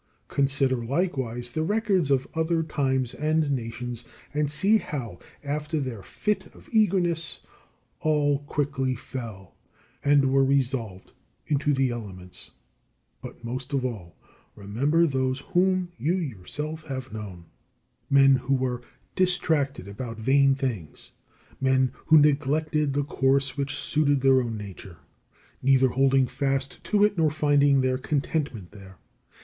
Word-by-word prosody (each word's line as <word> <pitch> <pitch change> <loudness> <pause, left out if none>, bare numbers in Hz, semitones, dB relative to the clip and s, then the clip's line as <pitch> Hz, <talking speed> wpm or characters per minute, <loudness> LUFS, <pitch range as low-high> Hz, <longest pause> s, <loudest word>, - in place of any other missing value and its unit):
Consider, 135 -3 +2
likewise, 125 -4 -2
the 155 - -2
records 195 -3 +1
of 135 -2 +2
other 160 0 +1
times 130 -5 -1
and 155 -1 0
nations, 120 -1 -4 0.3
and 150 -1 0
see 200 +8 +3
how, 125 - -6 0.2
after 150 +2 -2
their 130 -7 -4
fit 210 - -2
of - - -17
eagerness, 175 -7 +1 0.6
all 145 -2 +2
quickly 140 -3 -1
fell, 110 -7 -8 0.5
and 140 -2 +4
were 135 0 +5
resolved 130 -8 -1 0.3
into 145 0 +1
the 135 -2 +2
elements. 95 -6 -7 0.7
But - - -10
most 130 +4 -5
of 135 -2 0
all, 100 -9 -6 0.4
remember 135 +12 +1
those 130 -2 -1
whom 185 -1 +2
you 165 +5 +1
yourself 150 - -4
have 130 -3 -5
known, 95 -6 -8 0.6
men 135 -1 +6
who 130 +2 0
were 125 -2 -1 0.3
distracted 160 - +1
about 115 +3 -6
vain 135 +4 +4
things, 115 - -4 0.5
men 130 -1 +2 0.2
who 160 - +7
neglected 150 0 +2
the 145 +1 +1
course 135 -1 +1
which 140 0 -2
suited 145 -2 +1
their 135 -1 +5
own 115 -3 -3
nature, 95 -3 -9 0.6
neither 135 0 +4
holding 135 +1 +3
fast 135 +1 -2
to 205 -1 +3
it 210 -4 +2
nor 160 -1 +4
finding 145 -2 +3
their 130 0 0
contentment 140 - -2
there. 95 -3 -13
135 Hz, 130 wpm, -26 LUFS, 125-150 Hz, 0.7 s, who